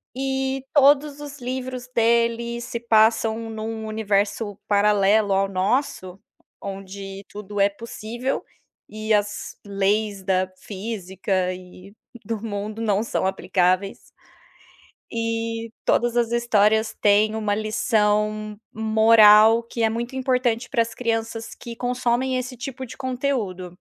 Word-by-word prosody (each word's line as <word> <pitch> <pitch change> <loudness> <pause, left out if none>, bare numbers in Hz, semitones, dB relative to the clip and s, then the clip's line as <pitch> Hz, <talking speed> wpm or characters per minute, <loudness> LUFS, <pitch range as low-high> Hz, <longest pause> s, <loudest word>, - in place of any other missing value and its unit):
E 265 0 -2
todos 290 0 +4
os 290 -1 -8
livros 255 0 -5
dele 235 0 +2
se 235 -1 -5
passam 220 0 +3
em 225 -1 -6
um 220 0 -4
universo 205 -1 -1
paralelo 205 0 +3
ao 195 +1 +2
nosso, 190 -1 -1 0.4
onde 195 0 -7
tudo 205 0 -7
é 200 - +5
possível, 230 +4 -5 0.5
e 215 0 -2
as 205 -1 -1
leis 200 +1 0
da 185 0 0
física 190 -3 -3
e 180 +2 -13 0.3
do 225 -1 -3
mundo 215 +1 -4
não 210 -1 +1
são 230 - -1
aplicáveis. 185 0 +1 1.1
E, 230 0 -3
todas 240 0 +2
as 235 -1 +1
histórias 220 -2 +2
têm 210 +1 +4
uma 210 -2 0
lição 215 -1 0 0.2
moral, 220 0 +6
que 230 0 -4
é 225 - +4
muito 235 +3 -4
importante 250 -2 0
pras 230 -3 0
crianças 225 -1 -3
que 235 -1 -9
consomem 250 +1 0
esse 255 0 -4
tipo 260 +1 -6
de 255 - -10
conteúdo. 250 -9 -2
220 Hz, 120 wpm, -23 LUFS, 205-235 Hz, 1.1 s, moral